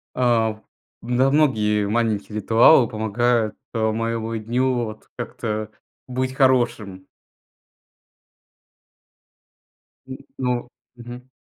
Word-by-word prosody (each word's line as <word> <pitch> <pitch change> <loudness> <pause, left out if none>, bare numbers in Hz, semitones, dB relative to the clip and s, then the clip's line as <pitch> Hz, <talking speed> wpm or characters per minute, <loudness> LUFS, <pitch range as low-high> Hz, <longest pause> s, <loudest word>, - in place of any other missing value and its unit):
А, 120 -3 +2
в 110 - -19 0.4
Да, 125 +3 +1
многие 105 -9 +2
маленькие 110 -1 -1
ритуалы 115 +4 +5
помогают, 110 +1 0 0.2
а, 110 -1 0
моему 115 0 -3
дню 125 +4 0
вот 110 -1 -10
как-то 110 -1 -4 0.4
быть 130 0 -2
хорошим. 120 -8 +1 3.0
М, 130 0 -7 0.2
ну, 125 -2 -2 0.3
мгм. 120 +1 -11
115 Hz, 90 wpm, -22 LUFS, 110-125 Hz, 3.0 s, ритуалы